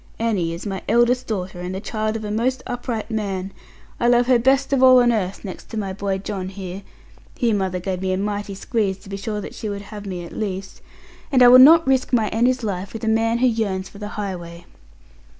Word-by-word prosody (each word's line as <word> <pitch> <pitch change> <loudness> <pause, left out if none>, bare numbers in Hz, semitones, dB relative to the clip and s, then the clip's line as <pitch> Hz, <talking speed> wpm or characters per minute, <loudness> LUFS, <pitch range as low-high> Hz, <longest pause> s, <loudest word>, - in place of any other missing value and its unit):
Annie 205 -8 0
is 170 +4 -7
my 195 -2 -4
eldest 240 +2 +3
daughter, 190 -4 -4
and 180 +1 -4
the - - -3
child 215 +1 -3
of 220 -1 -4
a 210 - -4
most 250 +4 -1
upright 240 -2 -4
man. 195 -3 -3 0.5
I 235 - +2
love 240 0 +4
her 250 -1 +4
best 270 +3 +2
of 270 - +2
all 255 -1 +8
on 240 -1 +4
earth, 200 -3 -2
next 190 - -8
to 225 - -6
my 195 -3 -3
boy 195 0 -2
John 190 -1 -5
here' 190 -1 -7 0.6
here 235 -2 +1
mother 190 -3 -1
gave 185 0 -3
me 190 0 -1
a 185 - 0
mighty 205 0 -3
squeeze, 195 -1 -1
to 195 - -15
be 195 - -4
sure 210 +1 -4
that - - -8
she 215 - -5
would 200 0 -5
have 205 -1 -7
me 180 -2 -5
at - - -11
least 195 -2 -5 0.5
'and 255 -2 +5
I 245 - +9
will 255 +1 +9
not 320 +5 +8
risk 265 -1 +1
my 220 -4 +3
Annie's 245 +2 +1
life 195 -2 -4
with 225 - -7
a - - -2
man 225 +1 +2
who 255 +2 +3
yearns 200 -5 -1
for 200 - -14
the 210 - -5
highway.' 175 -4 -6
210 Hz, 235 wpm, -21 LUFS, 190-235 Hz, 0.6 s, I